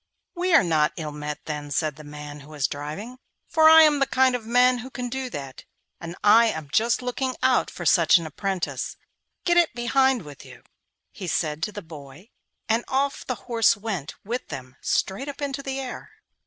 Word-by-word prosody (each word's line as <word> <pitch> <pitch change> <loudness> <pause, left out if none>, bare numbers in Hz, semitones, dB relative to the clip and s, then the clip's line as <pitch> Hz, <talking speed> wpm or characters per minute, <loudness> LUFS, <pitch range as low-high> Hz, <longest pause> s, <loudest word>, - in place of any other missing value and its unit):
'We 360 -1 +1
are 315 - +7
not 155 -3 +2
ill 155 -3 -4
met, 150 0 -6
then,' 150 -1 -5
said 150 0 -1
the 155 - -12
man 150 0 -9
who 145 +1 -14
was 150 -3 -2
driving, 155 - -7 0.3
'for 315 -1 +5
I 320 0 +9
am 300 -2 +4
the 275 - +2
kind 260 0 +3
of 225 -3 -6
man 250 +1 +4
who 250 +2 -8
can 250 -1 -5
do 260 +1 -4
that, 135 - -8 0.4
and 170 +1 -7
I 225 +3 +7
am 160 -8 -4
just 235 +6 +2
looking 255 +1 -2
out 260 -1 +3
for 175 - -8
such 170 +1 +5
an 170 - -4
apprentice. 185 +3 -3 0.5
Get 345 -1 +3
up 345 -1 +5
behind 255 0 +2
with 145 -3 -12
you,' - - -14 0.5
he 190 - -8
said 155 -2 -1
to 185 - -1
the 205 -1 -8
boy, 160 - -12 0.4
and 230 +1 +1
off 275 +2 -1
the 255 - -1
horse 230 -4 +3
went 200 -9 -5
with 240 +4 -4
them 130 0 -8
straight 210 +10 -1
up 280 - -8
into 280 -1 -3
the 270 -1 -4
air. 255 -2 -7
220 Hz, 200 wpm, -24 LUFS, -, 0.5 s, I